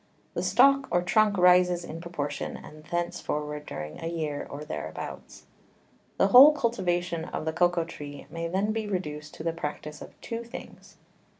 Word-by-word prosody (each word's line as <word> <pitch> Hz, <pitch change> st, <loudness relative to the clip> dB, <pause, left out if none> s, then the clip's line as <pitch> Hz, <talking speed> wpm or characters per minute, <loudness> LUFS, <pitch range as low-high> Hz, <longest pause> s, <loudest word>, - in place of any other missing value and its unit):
The -, -, -2 dB
Stalk 275 Hz, 0 st, +4 dB
or 175 Hz, 0 st, +2 dB
Trunk 215 Hz, 0 st, +3 dB
rises 180 Hz, -1 st, +5 dB
in 165 Hz, 0 st, -7 dB
proportion, 170 Hz, -4 st, -4 dB
and 155 Hz, 0 st, -13 dB
thence 175 Hz, +1 st, -2 dB
forward 150 Hz, 0 st, -4 dB
during 75 Hz, 0 st, -6 dB
a 165 Hz, -, -4 dB
Year, 155 Hz, -4 st, -3 dB
or 145 Hz, +2 st, -7 dB
thereabouts. 80 Hz, -, -7 dB, 0.7 s
The 195 Hz, -, +4 dB
whole 270 Hz, +7 st, +10 dB
Cultivation 175 Hz, -, -1 dB
of 160 Hz, -, -5 dB
the 160 Hz, -, -1 dB
Cocao 175 Hz, 0 st, +2 dB
Tree 145 Hz, -4 st, -9 dB
may 165 Hz, 0 st, -3 dB
then 195 Hz, +5 st, 0 dB
be 220 Hz, -1 st, -2 dB
reduced 150 Hz, -6 st, -4 dB
to -, -, -8 dB
the 165 Hz, 0 st, 0 dB
Practice 150 Hz, -1 st, -6 dB
of -, -, -12 dB
two 230 Hz, 0 st, -5 dB
Things. 235 Hz, +2 st, -11 dB
170 Hz, 170 wpm, -27 LUFS, 150-190 Hz, 0.7 s, whole